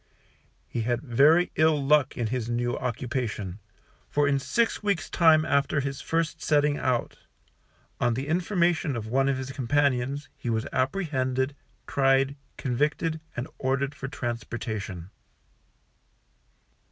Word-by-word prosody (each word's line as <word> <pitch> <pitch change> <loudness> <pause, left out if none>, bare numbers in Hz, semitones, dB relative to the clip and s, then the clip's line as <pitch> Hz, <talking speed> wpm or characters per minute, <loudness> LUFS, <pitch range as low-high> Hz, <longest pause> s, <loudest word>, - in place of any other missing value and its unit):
He 120 - -3
had 120 +3 -1
very 150 +7 +4
ill 155 -1 +4
luck 145 -2 +3
in 120 - 0
his 120 0 -2
new 120 0 0
occupation, 120 -6 -3 0.5
for 145 0 +2
in 140 -1 +2
six 230 - 0
weeks' 200 -5 -1
time, 160 -2 +5
after 140 +1 +2
his 140 0 -3
first 165 0 -1
setting 145 -1 +3
out 125 -2 -1 0.8
on 120 - +2
the 135 +3 -3
information 170 -3 +1
of 115 -2 -4
one 135 +4 +1
of 135 - +1
his 130 0 -5
companions, 140 +1 0
he 120 - -5
was 110 -1 0
apprehended, 130 -3 0 0.3
tried, 135 0 +2 0.2
convicted, 150 +5 0 0.2
and 120 +4 -3
ordered 135 +2 0
for 135 - -6
transportation. 110 -7 -5
135 Hz, 130 wpm, -27 LUFS, 120-150 Hz, 0.8 s, time